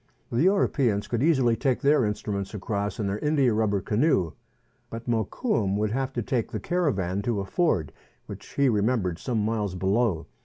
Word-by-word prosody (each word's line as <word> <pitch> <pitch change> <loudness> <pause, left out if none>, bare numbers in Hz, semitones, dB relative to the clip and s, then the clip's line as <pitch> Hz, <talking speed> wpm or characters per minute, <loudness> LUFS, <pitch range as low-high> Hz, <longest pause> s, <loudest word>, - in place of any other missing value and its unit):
The 120 - +1
Europeans 140 - +2
could 120 -1 -1
easily 135 -7 +3
take 130 0 0
their 140 -3 +4
instruments 105 -1 -3
across 100 -1 -3
in 105 - -1
their 100 +2 -2
india 140 -4 +2
rubber 105 -2 +1
canoe; 105 - +1 0.6
but 115 +1 -8
Mokoum 110 - 0
would 105 0 0
have 135 +2 -1
to 120 - -2
take 120 0 -1
the 110 - -3
caravan 100 - 0
to 110 0 -1
a 100 - -3
ford 95 - 0 0.3
which - - -9
he 140 -1 +3
remem 110 0 +2
bered 90 -2 -3
some 115 -5 -1
miles 105 -4 -1
below. 95 -2 +1
110 Hz, 180 wpm, -26 LUFS, 100-130 Hz, 0.6 s, their